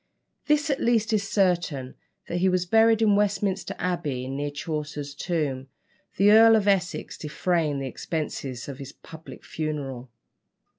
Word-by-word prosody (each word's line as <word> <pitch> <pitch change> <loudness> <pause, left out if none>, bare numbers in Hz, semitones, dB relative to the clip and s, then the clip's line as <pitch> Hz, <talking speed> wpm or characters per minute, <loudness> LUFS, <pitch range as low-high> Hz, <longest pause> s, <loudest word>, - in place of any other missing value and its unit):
This 300 0 +2
at 275 - -1
least 225 -2 +2
is 200 -1 0
certain, 175 -9 0 0.3
that 175 - -2
he 190 +1 +3
was 180 -1 +1
buried 225 +3 +4
in 210 -2 +4
Westminster 200 -1 0
Abbey, 155 -8 -2
near 140 +2 -3
Chaucer's 150 -1 -5
tomb, 145 -4 -2 0.5
the 200 +1 +5
Earl 225 +1 +8
of 210 -2 +1
Essex 185 -3 0
defraying 155 -1 -1
the 135 - -3
expenses 135 -4 -4
of 140 -1 -7
his 140 0 -8
public 160 0 -13
funeral. 140 -5 -4
170 Hz, 145 wpm, -25 LUFS, 145-205 Hz, 0.5 s, Earl